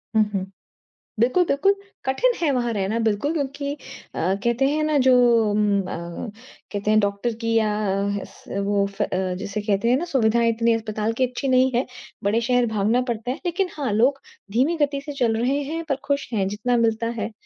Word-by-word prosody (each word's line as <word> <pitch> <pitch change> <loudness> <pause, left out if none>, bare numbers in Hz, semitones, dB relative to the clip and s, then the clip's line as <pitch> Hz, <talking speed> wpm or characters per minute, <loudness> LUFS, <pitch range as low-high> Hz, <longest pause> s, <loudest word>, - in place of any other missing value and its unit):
हुँ, 215 - +6
हुँ। 190 -1 -1 0.7
बिल्कुल-बिल्कुल। 315 - +3 0.3
कठिन 475 - +2
है 315 - +2
वहाँ 240 -2 0
रहना 200 +2 -1
बिल्कुल 220 +9 0
क्योंकि 280 -1 -3
अ, 285 - -12 0.3
कहते 235 +3 +2
हैं 305 +1 0
ना 305 -1 +2
जो 260 - +6 0.4
उम, 210 0 +2
अ, 185 - -7 0.8
कहते 205 +1 -1
हैं 215 - +5
डॉक्टर 200 +3 -1
की 230 0 0
या 220 -1 +3 0.6
स 200 - -7
वो 200 -1 +2 0.2
अ - - +5
अ, 185 0 -1
जिसे 200 +2 -4
कहते 210 +2 +1
हैं 255 - +4
ना 345 - -2
सुविधाएँ 235 -5 +2
इतनी 230 0 +2
अस्पताल 220 0 -2
की 260 - +3
अच्छी 255 +2 -4
नहीं 260 0 +4
है, 250 - +2 0.4
बड़े 215 +3 +2
शहर 245 0 +2
भागना 220 +5 +2
पड़ता 235 +2 -2
है। 275 - -4
लेकिन 360 +2 0
हाँ, 265 -7 -1
लोग 265 +6 +3 0.3
धीमी 270 +9 +2
गति 280 -1 +1
से 290 - -5
चल 225 -2 +2
रहे 255 +5 +1
हैं 330 0 -3
पर 275 - +2
खुश 280 0 -1
हैं। 195 -3 +1
जितना 225 +5 0
मिलता 225 +1 0
है, 215 +2 -3
235 Hz, 190 wpm, -23 LUFS, 215-275 Hz, 0.8 s, हुँ